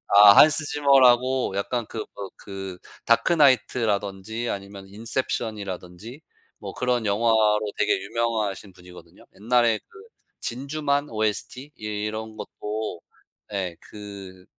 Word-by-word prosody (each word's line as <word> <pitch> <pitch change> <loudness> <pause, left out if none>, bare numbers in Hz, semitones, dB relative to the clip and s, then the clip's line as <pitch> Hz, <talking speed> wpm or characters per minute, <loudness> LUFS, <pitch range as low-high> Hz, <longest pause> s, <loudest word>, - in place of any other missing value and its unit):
아 100 0 +10
Hans 150 0 +6
Zimmer라고 130 -5 +3
약간 115 +3 -2
그 110 - -5
뭐 100 -2 -6
그 95 -2 -8 0.3
다크나이트라든지 115 - +2
아니면 100 0 -7
인셉션이라든지 110 - -5 0.4
뭐 100 -2 -7
그런 125 -3 -1
영화로 105 0 +3 0.2
되게 - - +2
유명하신 105 -2 -2
분이거든요. 90 -1 -16
옛날에 115 +1 +2
그 420 - -15 0.4
진주만 140 +3 -2
OST 110 +6 -3
예 105 - -5 0.2
이런 110 0 -5
것도 105 -5 -5 0.5
예 95 -4 -3
그 100 -3 -10
110 Hz, 290 characters per minute, -24 LUFS, 100-125 Hz, 0.5 s, 아